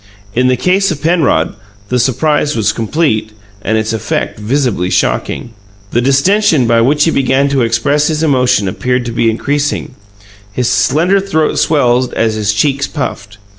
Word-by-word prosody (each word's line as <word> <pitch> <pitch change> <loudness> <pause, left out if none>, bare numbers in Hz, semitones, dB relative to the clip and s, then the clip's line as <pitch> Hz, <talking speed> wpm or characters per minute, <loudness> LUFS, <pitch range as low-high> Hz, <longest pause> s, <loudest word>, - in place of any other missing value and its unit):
In 125 +1 +2
the 130 0 +2
case 185 +8 +1
of 160 - -3
Penrod, 155 - +1 0.3
the 125 - 0
surprise 150 +4 0
was 110 -4 +1
complete 110 -2 -1 0.3
and 110 +2 0
its 110 +1 -1
effect 110 -1 -3
visibly 110 -5 -1
shocking. - - -1 0.4
The 120 - +1
distention 140 - +2
by 115 0 +3
which 145 +5 +2
he 165 - +2
began 135 0 +1
to 140 -2 +1
express 120 +6 +1
his 155 0 -1
emotion 125 -9 +2
appeared 125 +6 -1
to 120 - -4
be 115 0 +1
increasing; 145 +6 -2 0.6
his 125 +3 -1
slender 165 +10 +2
throat 175 -6 0
swelled 125 -4 +1
as 115 -1 +1
his 105 -1 0
cheeks 140 +5 0
puffed. 105 -8 -5
130 Hz, 160 wpm, -13 LUFS, 115-150 Hz, 0.6 s, by